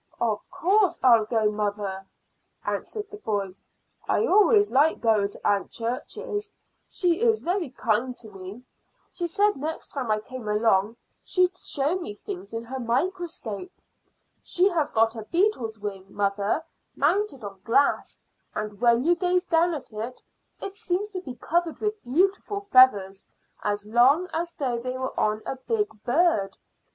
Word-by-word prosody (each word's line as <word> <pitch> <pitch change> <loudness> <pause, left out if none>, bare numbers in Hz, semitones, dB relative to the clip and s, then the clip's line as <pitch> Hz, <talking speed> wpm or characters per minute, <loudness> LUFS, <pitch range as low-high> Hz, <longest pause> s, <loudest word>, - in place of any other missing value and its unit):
"Of 220 -3 0
course 390 +2 +2
I'll 230 -4 +6
go, 215 -1 +1
mother," 205 -2 -3 0.6
answered 420 -2 -4
the 415 - -8
boy. 200 - -2 0.5
"I - - +2
always 415 0 +5
like 290 +4 +3
going 215 -3 +2
to - - -5
Aunt 200 -1 +1
Church's; 260 - -4 0.4
she 355 +1 +1
is 455 -2 +3
very 355 -2 -1
kind 245 0 -1
to 225 - -9
me. 195 +5 -9 0.5
She 345 - -3
said 410 +4 +2
next 310 +4 -4
time 260 -5 -3
I 215 - +3
came 245 +1 -8
along 210 0 +2 0.3
she'd 365 0 +2
show 305 +1 -1
me 210 - -6
things 200 -1 -8
in 230 0 -4
her 260 +3 -6
microscope. 325 - -2 0.7
She 365 +3 +2
has 320 -5 0
got 225 -1 +2
a 225 - -5
beetle's 335 - 0
wing, 200 -2 -6
mother, 200 +8 0 0.3
mounted 325 - +1
on 200 -1 -8
glass, 275 +5 +2 0.4
and 210 0 -5
when 235 0 +4
you 340 +4 +4
gaze 360 +1 +1
down 340 0 +2
at 265 -6 -8
it 225 +4 -6 0.4
it 395 - -6
seems 390 +2 -2
to 375 -3 -5
be 260 -8 -8
covered 335 +6 -1
with 425 0 -2
beautiful 390 +9 0
feathers, 200 -7 +5 0.4
as 205 0 -1
long 255 +11 +4
as 340 +1 -2
though 250 -4 -2
they 255 +2 -4
were 260 0 -3
on 215 0 +1
a 270 - -4
big 420 - -1
bird. 245 - +2
255 Hz, 155 wpm, -26 LUFS, 215-355 Hz, 0.7 s, I'll